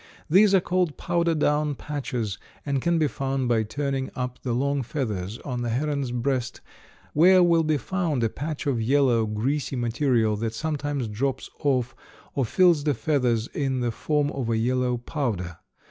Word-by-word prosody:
These 195 +4 +5
are - - +6
called 180 -3 0
powder 170 -1 +1
down 150 -1 +1
patches, 125 -8 -4 0.3
and 140 -2 0
can 170 +3 +2
be 155 -2 +3
found 135 -2 -2
by 115 -2 +3
turning 135 +5 -2
up 125 -1 -4
the 125 - -2
long 140 +3 0
feathers 110 -7 -3
on 125 -3 -3
the 120 - -2
heron's 140 +2 -1
breast, 125 +1 -2 0.5
where 180 +4 +6
will 170 -1 +4
be 155 -1 +1
found 160 -3 -1
a 115 - +2
patch 150 +5 -5
of 130 -5 0
yellow, 120 -2 +3
greasy 135 +7 -1
material 120 -2 +1
that 115 +1 -3
sometimes 145 -3 -2
drops 130 +5 -2
off 130 -4 0 0.4
or 135 - 0
fills 170 - +4
the 145 -2 +1
feathers 125 -5 +1
in 135 -3 -1
the 120 -1 0
form 145 +4 0
of 130 -4 -3
a 115 - +1
yellow 125 +1 +1
powder. 110 - -3
135 Hz, 170 wpm, -25 LUFS, 120-150 Hz, 0.5 s, are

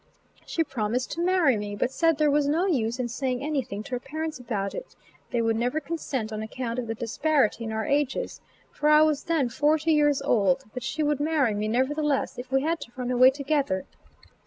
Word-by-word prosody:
She 330 - 0
promised 245 -3 -2
to 335 - -3
marry 350 -7 +3
me, 205 0 -4
but 240 - -1
said 330 +1 +2
there 300 -1 +3
was 290 0 +2
no 325 +6 +2
use 240 - 0
in 250 -2 -1
saying 255 +1 -2
anything 260 -9 -2
to - - -12
her 250 - -1
parents 310 +2 -5
about 205 -5 -3
it; - - -8 0.3
they 235 -1 0
would 225 0 +1
never 245 +6 0
consent 275 -7 -4
on 215 - -3
account 235 +2 -4
of 240 - -4
the 225 - -3
disparity 235 0 +1
in 220 - -4
our 220 0 -2
ages, 290 - -1 0.3
for 300 - 0
I 305 0 +7
was 305 -2 +1
then 320 -6 +1
forty 300 +6 +2
years 295 -2 +3
old; 195 -6 +2
but 250 - -5
she 310 +5 -2
would 295 -1 +1
marry 290 -6 +2
me 210 +1 -2
nevertheless, 275 +5 0
if 250 +1 -8
we 270 0 +2
had 330 +2 0
to 235 - -9
run 250 -1 -3
away 255 +1 +7
together. 275 -8 -1
265 Hz, 210 wpm, -26 LUFS, 235-300 Hz, 0.3 s, I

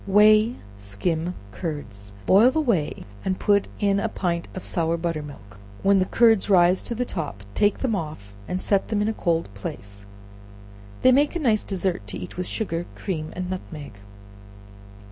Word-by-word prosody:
Whey 215 +4 +5 0.2
Skim 160 - -2 0.2
Curds. 105 - -6
Boil 215 +6 +6
the 315 - 0
whey, 215 - 0 0.2
and 190 -1 -1
put 200 -1 +3
in 200 -1 +2
a 225 - -1
pint 170 -4 -2
of 185 - -6
sour 165 -1 0
butter 165 -2 -2
milk; 105 -9 -12 0.2
when 195 0 +5
the 185 - +1
curds 225 -4 +4
rise 180 -1 +5
to 235 - -4
the 250 +2 -1
top 150 - -5
take 205 - +2
them 245 -5 0
off, 150 - -6
and 180 - -2
set 195 0 +1
them 210 -2 0
in - - 0
a 220 - 0
cold 165 -5 0
place; 100 0 -8 1.0
they 255 - +7
make 285 +5 +3
a - - 0
nice 225 -8 +2
dessert 185 - -2
to - - -5
eat 90 - -8
with 180 0 -3
sugar, 175 -6 -3
cream 160 -5 -4
and 180 0 -3
nutmeg. 155 -5 -6
180 Hz, 175 wpm, -24 LUFS, 155-210 Hz, 1.0 s, they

